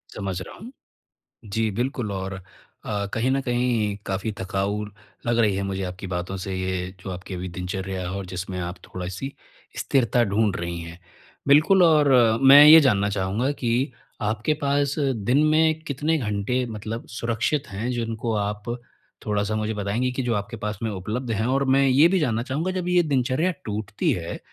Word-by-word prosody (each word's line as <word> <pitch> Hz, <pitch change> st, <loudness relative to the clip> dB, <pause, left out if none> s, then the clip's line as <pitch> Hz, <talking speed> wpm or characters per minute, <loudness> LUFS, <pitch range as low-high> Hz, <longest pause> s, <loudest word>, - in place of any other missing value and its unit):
समझ 95 Hz, -2 st, -3 dB
रहा -, -, -9 dB
हूँ। 235 Hz, +4 st, -10 dB, 0.7 s
जी, 110 Hz, +2 st, -1 dB
बिल्कुल 120 Hz, 0 st, -2 dB
और 95 Hz, 0 st, -4 dB, 0.4 s
अ, 100 Hz, -1 st, -2 dB
कहीं 120 Hz, +3 st, +1 dB
न 135 Hz, -, +2 dB
कहीं 120 Hz, -5 st, 0 dB
काफ़ी 95 Hz, +3 st, -2 dB
थकाऊ 100 Hz, +2 st, -2 dB, 0.4 s
लग 120 Hz, 0 st, +2 dB
रही 105 Hz, -4 st, +3 dB
है 100 Hz, -, -2 dB
मुझे 95 Hz, 0 st, -3 dB
आपकी 90 Hz, +2 st, -6 dB
बातों 90 Hz, +1 st, -3 dB
से, 95 Hz, +1 st, -5 dB
ये 95 Hz, 0 st, -3 dB
जो 95 Hz, -, -8 dB
आपकी 90 Hz, +1 st, -7 dB
दिनचर्या 95 Hz, +1 st, -4 dB
है 90 Hz, -, -4 dB
और 95 Hz, -, -5 dB
जिसमें 90 Hz, +1 st, -5 dB
आप 90 Hz, +1 st, -4 dB
थोड़ी-सी 95 Hz, +9 st, -6 dB, 0.5 s
स्थिरता 120 Hz, -2 st, +2 dB
ढूँढ 100 Hz, 0 st, +1 dB
रही 85 Hz, 0 st, -4 dB
हैं। 85 Hz, +1 st, -9 dB, 0.5 s
बिल्कुल 155 Hz, +6 st, +6 dB
और 150 Hz, -4 st, +5 dB, 0.3 s
मैं 140 Hz, +2 st, +9 dB
ये 160 Hz, +2 st, +11 dB
जानना 100 Hz, -7 st, +2 dB
चाहूँगा 100 Hz, +7 st, -1 dB
कि 125 Hz, 0 st, -1 dB, 0.4 s
आपके 115 Hz, +8 st, 0 dB
पास 140 Hz, 0 st, +1 dB
दिन 130 Hz, +1 st, +1 dB
में 160 Hz, 0 st, +3 dB
कितने 150 Hz, +3 st, 0 dB
घंटे 115 Hz, +2 st, -1 dB
मतलब 110 Hz, +2 st, -6 dB
सुरक्षित 120 Hz, +6 st, -1 dB
हैं, 105 Hz, +5 st, -3 dB
जिनको 115 Hz, -1 st, -2 dB
आप 105 Hz, 0 st, -5 dB, 0.6 s
थोड़ा-सा 105 Hz, 0 st, 0 dB
मुझे 110 Hz, +1 st, -1 dB
बताएँगी 105 Hz, +5 st, -1 dB
कि 130 Hz, 0 st, -3 dB
जो 120 Hz, -1 st, 0 dB
आपके 105 Hz, +3 st, -4 dB
पास 105 Hz, -2 st, -4 dB
में 110 Hz, -, 0 dB
उपलब्ध 110 Hz, +6 st, -4 dB
हैं 110 Hz, +2 st, 0 dB
और 140 Hz, -, +1 dB
मैं 135 Hz, 0 st, +4 dB
ये 140 Hz, +5 st, +6 dB
भी -, -, +3 dB
जानना 115 Hz, -7 st, 0 dB
चाहूँगा 150 Hz, +8 st, -2 dB
जब 175 Hz, -, -4 dB
ये 180 Hz, -1 st, +4 dB
दिनचर्या 140 Hz, +4 st, +1 dB
टूटती 105 Hz, -1 st, -1 dB
है, 85 Hz, -2 st, -4 dB
110 Hz, 175 wpm, -24 LUFS, 95-130 Hz, 0.7 s, ये